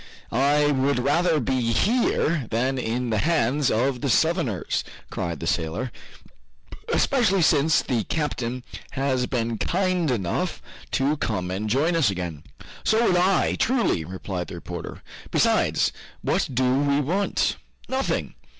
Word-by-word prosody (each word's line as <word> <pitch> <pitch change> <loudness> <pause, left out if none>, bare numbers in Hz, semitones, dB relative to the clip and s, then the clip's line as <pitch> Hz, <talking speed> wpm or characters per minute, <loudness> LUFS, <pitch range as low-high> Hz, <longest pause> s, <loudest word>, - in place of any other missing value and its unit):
"I 145 +4 +3
would 140 0 +1
rather 155 +5 +2
be 125 -2 0
here 170 - +1
than 130 +4 0
in 120 +1 -2
the 110 - +1
hands 145 -3 +2
of 125 +3 0
the 140 - -1
Southerners," 160 - +1 0.3
cried 85 -3 -3
the - - -5
sailor, 85 +9 -1 1.0
"especially 195 -9 +3
since 155 0 +4
the 120 -4 0
captain 125 -5 -2 0.3
has 130 -2 0
been 115 -3 -2
kind 185 -3 0
enough 100 -9 -1 0.3
to 140 +3 +1
come 90 -8 -2
and 105 +3 -2
join 150 +9 +2
us 155 -10 +3
again." 90 -6 -4 0.4
"So 225 +2 +3
would 180 - +3
I, 185 +1 +3
truly!" 235 - +1
replied 90 +1 -5
the - - -7
reporter. 85 -1 -7 0.3
"Besides, - - +2 0.3
what - - +1
do 130 +1 +2
we 140 0 +2
want? 180 +8 0 0.3
Nothing." 265 +1 -1
130 Hz, 135 wpm, -24 LUFS, 110-160 Hz, 1.0 s, since